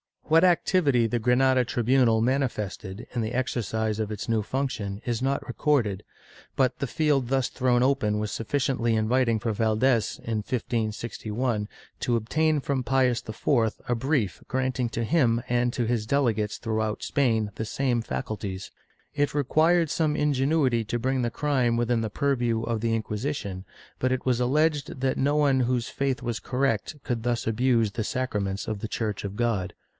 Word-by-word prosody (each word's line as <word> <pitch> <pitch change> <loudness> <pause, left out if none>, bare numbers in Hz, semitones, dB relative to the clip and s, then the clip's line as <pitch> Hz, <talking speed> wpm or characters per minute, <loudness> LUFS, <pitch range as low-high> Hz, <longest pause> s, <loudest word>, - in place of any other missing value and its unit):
^ 155 - -4
What 165 +2 +7
activity 160 -8 +3
the 120 +2 -1
Granada 125 +2 +3
tribunal 120 -1 +2
manifested 115 -6 -2
in 120 - -1
the 110 +2 -3
exercise 110 -3 -1
of 110 -1 -2
its 105 +2 -5
new 115 -1 +2
function 110 -5 -3
is 120 -1 -1
not 135 +1 0
recorded, 120 -7 0 0.5
but 130 -2 +1
the 140 - -1
field 145 -4 +1
thus 130 -1 +1
thrown 125 -1 +2
open 110 -6 +1
was 105 0 -2
sufficiently 120 -1 0
inviting 115 +1 +2
for 115 +1 -1
Valdes, 110 +2 +1
in 115 -1 -2
1561, 110 0 -2 0.3
to 120 - 0
obtain 150 +7 +1
from 135 -1 -1
Pius 125 -1 +2
IV 110 +1 +1 0.2
a - - +3
brief 120 - -1
granting 130 -1 -1
to 115 0 -3
him 120 -3 +2
and 120 0 +1
to 120 - -1
his 110 -2 -1
delegates 115 -6 +1
throughout 110 -1 -2
Spain 115 -7 +1
the 110 - -3
same 125 0 0
faculties.^ 95 +4 -5 0.4
It 145 -1 0
required 160 +4 +3
some 155 -1 +1
ingenuity 135 -4 +2
to 120 - -2
bring 130 +2 0
the 120 - +1
crime 125 -3 +1
within 120 0 +1
the 110 - -2
purview 120 -3 0
of 115 -1 -1
the 115 +1 0
Inquisition, 105 -4 -3 0.3
but 130 0 +1
it 130 - -3
was 125 -2 +2
alleged 145 +1 +1
that 130 -1 +1
no 145 +2 +2
one 140 -3 +3
whose 125 -1 0
faith 135 -2 -2
was 120 -2 -2
correct 130 0 -1
could 115 -2 -2
thus 120 -1 -1
abuse 115 -1 +2
the 110 0 -3
sacraments 105 -7 -2
of 110 -2 -3
the 110 - -4
Church 105 -2 -3
of 100 0 -5
God. 105 -6 -1
120 Hz, 170 wpm, -26 LUFS, 110-135 Hz, 0.5 s, What